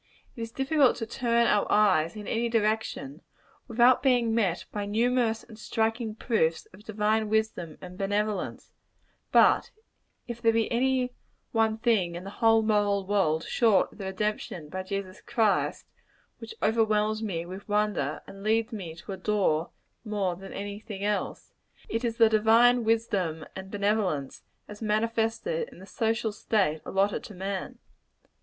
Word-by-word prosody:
It 235 - -7
is 230 0 -5
difficult 270 +1 +3
to 225 - -4
turn 235 0 +1
our 210 -3 +2
eyes 185 -6 +3
in 210 -1 -7
any 235 +1 0
direction, 215 - -1 0.5
without 240 +2 +4
being 245 -4 +3
met 195 -7 0
by 205 -1 -3
numerous 230 +1 +1
and 220 -2 -14
striking 225 0 -1
proofs 170 -9 0
of 195 +3 -15
divine 215 0 0
wisdom 215 -7 -1
and 180 0 -10
benevolence; 205 +1 -2 0.6
but - - +5 0.6
if 235 -1 -6
there 225 0 +4
be 225 -1 +1
any 250 +1 +1 0.4
one 220 -1 +2
thing 215 -7 +1
in 175 - -6
the 195 - -7
whole 225 +1 +3
moral 205 -2 +1
world, 185 -6 +1
short 225 -5 +2
of - - -18
the 195 - -5
redemption 190 -5 -3
by 185 +4 -4
Jesus 190 0 -5
Christ, 220 -3 0 0.5
which 450 - -9
overwhelms 215 -1 +2
me 175 -6 -3
with 190 +4 -9
wonder, 210 0 0
and 195 - -12
leads 225 +3 +1
me 175 -7 -6
to 170 +4 -9
adore 190 -4 0 0.3
more 205 -5 -1
than 195 +2 -10
any 205 +1 -5
thing 210 -3 -7
else, 210 0 -2 0.3
it 225 +2 -2
is 230 -1 -1
the 230 - +7
divine 225 +3 +5
wisdom 200 -8 0
and 190 0 -7
benevolence, 200 -9 -1 0.3
as 210 +1 -11
manifested 225 - 0
in - - -16
the 185 - -12
social 225 +1 -1
state 200 -7 0
allotted 195 +1 +1
to 210 - -10
man. 190 +1 -4
215 Hz, 155 wpm, -28 LUFS, 195-225 Hz, 0.6 s, the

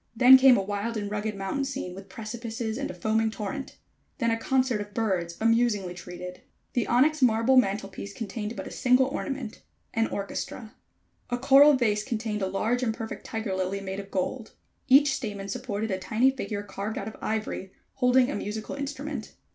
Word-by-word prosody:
Then 255 +2 +9
came 260 -1 +7
a 195 - 0
wild 205 +3 -3
and 205 -1 -4
rugged 210 0 -2
mountain 195 +8 -2
scene 270 -9 -4
with 195 +1 -11
precipices 225 +2 -5
and 280 - -3
a - - -5
foaming 220 +4 +1
torrent. 220 +6 -5 0.4
Then 230 -4 +1
a - - +2
concert 255 -1 +1
of 205 0 -9
birds 180 -6 -1
amusingly 225 -5 +2
treated. 180 0 -8 0.3
The 245 - 0
onyx 290 +5 +3
marble 235 +1 +4
mantel 200 -5 +3
piece 195 +1 -8
contained 210 +1 -5
but - - -6
a - - -8
single 255 +1 +4
ornament 270 -3 -4 0.3
an 225 0 +2
orchestra. 215 +3 -5 0.6
A 245 - 0
coral 275 +3 +7
vase 215 -5 +1
contained 215 -3 -3
a 190 - +1
large 225 +6 0
and 225 -3 0
perfect 225 0 -7
tiger 220 -3 -3
lily, 190 +1 -1
made 190 0 -5
of 200 0 -8
gold. 215 +5 -3 0.3
Each 275 +1 +6
stamen 205 -7 -4
supported 215 0 -3
a 190 - -1
tiny 220 +7 +2
figure 215 -6 -4
carved 205 +1 -5
out 200 - -4
of 220 - -7
ivory, 215 -3 -3 0.2
holding 250 0 +3
a - - -3
musical 210 +1 -4
instrument. 280 -3 -5
220 Hz, 185 wpm, -27 LUFS, 200-255 Hz, 0.6 s, Then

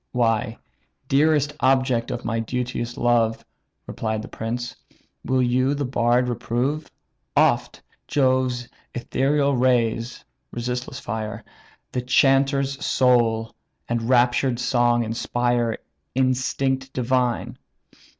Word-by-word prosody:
"Why, 115 -1 +1 0.5
dearest 145 0 +3
object 130 -3 +2
of 120 0 -5
my 115 -1 -1
duteous 120 0 -3
love, 115 -1 +1 0.4
(Replied 110 -1 -3
the - - -8
prince,) 120 +2 -4 0.5
will 130 -1 +1
you 130 +3 +2
the 145 0 -2
bard 125 0 +2
reprove? 125 +5 -2 0.5
Oft, - - +2 0.2
Jove's 130 -3 +1 0.3
ethereal 140 +3 +1
rays 120 -1 +1 0.2
(resistless 125 +3 -4
fire) 110 -5 -5 0.5
The 125 - -2
chanter's 135 +2 +2
soul 115 -3 +2 0.3
and 115 0 -2
raptured 125 0 +3
song 120 -1 +2
inspire 120 +1 0 0.4
Instinct 130 +1 0
divine? 125 -1 0
125 Hz, 100 wpm, -23 LUFS, 120-130 Hz, 0.5 s, dearest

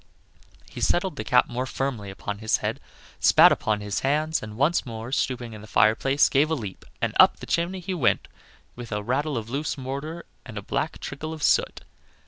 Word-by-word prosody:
He - - -9
settled 175 -2 +1
the 110 - -4
cap 125 +3 +4
more 125 +2 -3
firmly 125 -8 -3
upon 100 +1 -6
his 110 0 +1
head, - - -3 0.4
spat - - +7
upon 105 -1 0
his 105 +3 -2
hands, 155 +3 0
and 110 0 -8
once 150 +6 +2
more 115 0 -7
stooping 125 -3 -1
in 105 - -9
the 110 - -12
fireplace, 125 +7 +3
gave 145 +3 +2
a 160 - +1
leap, 105 -9 -7 0.2
and - - 0
up - - +7
the - - -9
chimney 180 +2 -1
he 185 +2 -4
went 140 -10 +1 0.5
with 120 -2 -9
a 105 0 -2
rattle 135 +4 -1
of 110 -1 -4
loose 145 +3 -2
mortar 140 +6 -5 0.2
and - - -9
a - - -5
black - - -2
trickle 155 +4 -6
of 155 -3 -7
soot. - - +2
130 Hz, 200 wpm, -25 LUFS, 110-150 Hz, 0.5 s, spat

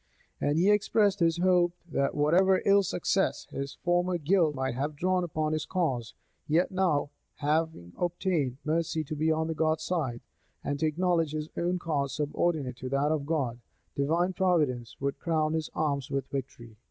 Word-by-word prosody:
And 145 +1 +1
he 185 +5 +4
expressed 205 -1 +2
his 165 -1 +2
hope, 175 -1 +3 0.2
that 140 - 0
whatever 180 +6 +3
ill 200 0 +6
success 190 +1 0
his 140 0 -5
former 175 +1 +2
guilt 165 -1 +2
might 130 -1 -1
have 145 +4 -3
drawn 185 +4 +1
upon 155 -2 -1
his 155 -1 -2
cause, 135 -11 -1 0.3
yet 165 +6 +2
now, 170 -7 +1 0.2
having 150 - -1
obtained 175 -7 -1
mercy 160 0 0
to 155 +1 -5
be 155 +2 +1
on 160 0 0
God's 155 0 0
side, 135 -10 -2 0.4
and 145 0 -2
to 160 - +2
acknowledge 165 -1 +1
his 155 0 -3
own 175 +1 0
cause 145 -6 -2
subordinate 150 -3 -1
to 130 +1 -6
that 140 +3 +1
of 145 -3 -1
God, 135 -7 -1 0.4
divine 165 +6 +1
providence 150 -11 0
would 140 0 -2
crown 155 -2 0
his 160 -1 -2
arms 140 -4 -1
with 135 -1 -1
victory. 120 -5 -6
155 Hz, 165 wpm, -29 LUFS, 140-175 Hz, 0.4 s, ill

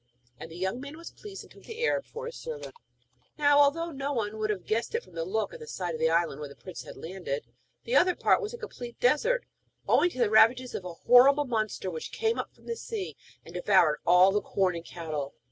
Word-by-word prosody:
And - - -8
the 165 - -10
young 190 +7 -2
man 285 +3 -8
was 335 - -9
pleased, 400 -2 -10
and - - -18
took - - -17
the 465 +1 -3
Arab - - +1
for 470 +1 -8
his 475 +1 -6
servant. 475 -1 -7 0.6
Now, 290 -1 +5
although 330 +4 +3
no 280 -1 -3
one 220 -3 -2
would 215 0 -1
have 205 -3 -2
guessed 230 - -1
it 465 - -1
from - - -19
the 165 0 -3
look 215 - -2
of - - -9
the 460 - -10
side 180 - -3
of 160 - -5
the 160 0 +3
island 165 -3 +1
where 150 -1 -6
the 140 - -13
prince 185 -2 -9
had - - -11
landed, 165 -7 -5 0.4
the 240 - -1
other 360 +5 +5
part - - +3
was 425 0 -4
a 475 - -7
complete 240 - -8
desert, 460 - +2 0.4
owing 355 - +4
to 295 - -12
the 235 -4 +2
ravages 245 +3 +5
of 185 - -5
a 175 -2 -6
horrible 270 - +6
monster 215 -6 -2
which 160 -2 -6
came 455 0 0
up - - -4
from - - -24
the 465 - -3
sea, 440 -4 -5 0.3
and 165 - -12
devoured 180 -4 +3
all 180 +2 +6
the 205 +1 +1
corn 190 -2 0
and 170 0 -6
cattle. 155 -5 -5
230 Hz, 245 wpm, -28 LUFS, -, 0.6 s, horrible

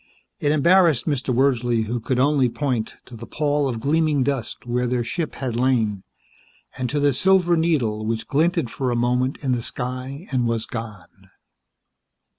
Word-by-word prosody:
It 145 - +1
embarrassed 165 -2 +4
Mr. 140 -4 -1
Wordsley, 120 -3 +2
who 120 +3 -2
could 125 +3 -2
only 135 -1 +3
point 125 -4 -2
to 125 - -11
the 115 +1 -9
pall 145 -2 0
of 115 -3 -3
gleaming 150 +1 +1
dust 130 -5 -3
where 125 +1 -1
their 120 0 0
ship 160 +6 -3
had 130 -4 -3
lain, 115 -5 +1 0.7
and 125 -1 -3
to 145 - -1
the 145 -1 +3
silver 180 +4 +3
needle 135 -11 0
which 110 +1 -2
glinted 160 -3 +1
for 130 -2 -2
a 120 - 0
moment 125 +2 0
in 135 - 0
the 120 -1 0
sky 130 +6 -5
and 125 -3 +1
was 115 -1 -1
gone. 110 -7 -9
130 Hz, 170 wpm, -22 LUFS, 120-145 Hz, 0.7 s, embarrassed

